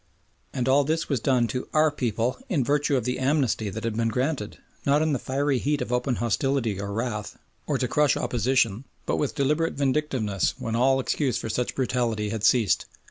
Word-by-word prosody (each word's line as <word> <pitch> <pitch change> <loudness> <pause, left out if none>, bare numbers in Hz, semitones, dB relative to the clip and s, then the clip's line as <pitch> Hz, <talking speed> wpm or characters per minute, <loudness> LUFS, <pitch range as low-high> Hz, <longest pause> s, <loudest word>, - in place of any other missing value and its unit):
And 125 -1 -2
all 140 +2 +5
this 160 +3 -1
was 140 -4 +1
done 125 0 +2
to 125 +4 -3
"Our 155 0 +5
people" 120 -3 -1
in 150 -8 +1
virtue 145 +1 +1
of 125 - -1
the 125 +2 -2
"Amnesty" 130 -6 +1
that 110 +3 -6
had 115 -2 -2
been 115 0 +1
granted, 125 -1 -2 0.3
not 145 +2 +3
in 155 -1 +1
the 135 - 0
fiery 135 0 0
heat 145 +2 0
of 125 - -3
open 125 +1 0
hostility 120 -3 0
or 100 0 -4
wrath, 110 -1 -3 0.3
or - - +1
to - - -1
crush 150 -2 +2
opposition, 120 -1 +1 0.2
but - - 0
with 145 - -1
deliberate 150 +4 +1
vindictiveness 130 - 0
when 115 0 -3
all 135 +3 +3
excuse 130 -1 0
for 115 - -4
such 125 +3 -2
brutality 120 -5 0
had 110 -1 -4
ceased. 110 -5 +3
125 Hz, 195 wpm, -25 LUFS, 115-140 Hz, 0.3 s, all